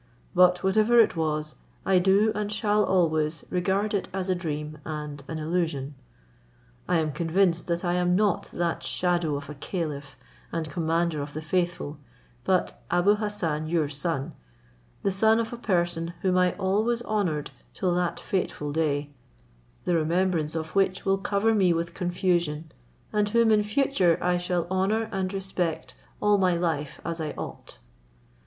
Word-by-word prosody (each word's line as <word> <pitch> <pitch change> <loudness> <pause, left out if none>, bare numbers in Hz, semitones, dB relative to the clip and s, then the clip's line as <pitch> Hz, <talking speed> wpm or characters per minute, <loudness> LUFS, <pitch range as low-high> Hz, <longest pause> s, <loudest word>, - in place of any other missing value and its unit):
But 180 0 +5
whatever 215 +5 +4
it 225 - +5
was, 155 -1 -1 0.3
I 190 -1 +4
do, 195 +4 +4
and 210 0 -3
shall 210 -1 +2
always 160 -4 +1
regard 190 +4 0
it 200 - -1
as 190 0 -3
a - - +4
dream 155 -3 -4
and 150 -2 -5
an 160 - -4
illusion. 155 -4 -1 1.0
I 180 - +4
am 155 -1 0
convinced 170 +3 +1
that 170 +1 -1
I 175 - +1
am 180 0 +2
not 205 -2 +1
that 170 -1 -1
shadow 175 -4 0
of 140 0 -5
a 150 - -6
caliph 145 -2 -4 0.4
and 165 -1 -2
commander 165 0 0
of 145 +1 -6
the 155 - -4
faithful, 175 -3 -1 0.4
but 185 +3 0
Abou 180 +4 +3
Hassan 170 -8 -2
your 160 -2 +1
son, 145 -1 -2 0.7
the 195 - +2
son 220 +4 +4
of 230 +1 -2
a - - -5
person 175 -5 -1
whom 185 -1 +2
I 180 -1 +3
always 215 +5 0
honoured 180 -10 -1 0.2
till 180 -2 0
that 175 -1 0
fatal 150 -6 -2
day, 145 -2 0 0.7
the 175 - +1
remembrance 165 -1 +1
of 160 -1 -4
which 195 -1 +1
will 195 0 +2
cover 200 +3 +1
me 190 -5 +4
with 170 0 -2
confusion, 175 -4 -1 0.4
and 210 -1 +2
whom 230 0 +4
in 210 -1 +5
future 210 - +2
I 180 0 +1
shall 175 -1 -1
honour 210 +4 +1
and 190 -2 -2
respect 180 -9 -3 0.3
all 210 -1 +3
my 185 -2 +3
life 160 -4 -2
as 170 -1 -3
I 155 -1 -3
ought." - - -8
175 Hz, 160 wpm, -26 LUFS, 160-195 Hz, 1.0 s, But